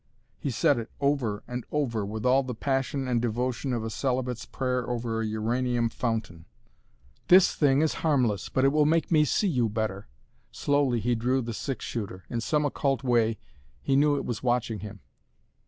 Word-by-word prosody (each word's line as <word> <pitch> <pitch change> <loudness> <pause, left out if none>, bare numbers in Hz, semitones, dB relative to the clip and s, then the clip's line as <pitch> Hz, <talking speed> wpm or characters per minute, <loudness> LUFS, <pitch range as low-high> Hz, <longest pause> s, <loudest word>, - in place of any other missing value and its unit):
He 140 - -2
said 130 +2 +2
it 115 - -6
over 140 -7 0
and 125 0 -4
over, 120 -8 -1
with 110 +3 -5
all 130 +2 +5
the 130 -3 -5
passion 135 +1 -1
and 120 -2 +1
devotion 125 +3 -1
of 120 -3 -1
a 110 - -4
celibate's 125 -1 -2
prayer 125 -2 -2
over 115 -2 -2
a - - -1
uranium 120 +2 0
fountain. 110 -9 -3 0.8
"This 185 +1 +6
thing 145 0 +3
is 160 - +1
harmless 125 - +1
but 130 - +1
it - - +6
will 150 0 +3
make 165 +1 +1
me 155 -2 +5
see 200 - +1
you 125 - +1
better!" 105 -2 -3 0.4
Slowly 135 - +1
he 120 +3 +1
drew 125 +3 +1
the 115 0 -4
six 135 +4 -4
shooter. 100 -5 -5
In 115 - -1
some 150 +5 +1
occult 140 -1 0
way 115 -3 +2 0.5
he 135 - +1
knew 145 +1 +4
it - - -3
was 115 -2 -3
watching 120 -3 0
him. 100 -2 -9
125 Hz, 185 wpm, -27 LUFS, 115-135 Hz, 0.8 s, This